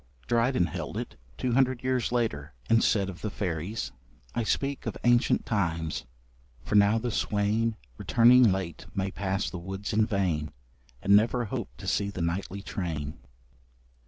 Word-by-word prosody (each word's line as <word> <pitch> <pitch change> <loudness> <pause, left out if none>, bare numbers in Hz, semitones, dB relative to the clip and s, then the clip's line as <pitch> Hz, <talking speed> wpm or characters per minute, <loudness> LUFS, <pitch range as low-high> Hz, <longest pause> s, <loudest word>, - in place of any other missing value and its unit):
Dryden 120 - +2
held 85 -1 -5
it, - - -5 0.2
two 125 - -1
hundred 130 0 +2
years 130 -2 0
later, 75 - -1
and 115 0 +4
said 100 -3 +2
of 90 -3 -8
the 105 - -2
fairies: 95 +1 -3 0.4
I - - 0
speak 135 +5 -1
of - - -3
ancient 120 0 +3
times, 80 - -1 0.6
for - - -5
now 105 +1 +5
the 120 +1 -2
swain 110 +2 +1 0.2
Returning 120 -1 +6
late 95 -4 -4
may 95 0 -1
pass 95 0 -1
the 90 - -5
woods 95 +5 -5
in 110 +1 +3
vain, 90 -8 0 0.5
And 100 +1 +6
never 115 +3 +3
hope 100 - -4
to - - -9
see 100 -1 0
the 90 -4 -4
nightly 95 +3 -3
train. 80 -8 -4
100 Hz, 160 wpm, -28 LUFS, 90-115 Hz, 0.6 s, Returning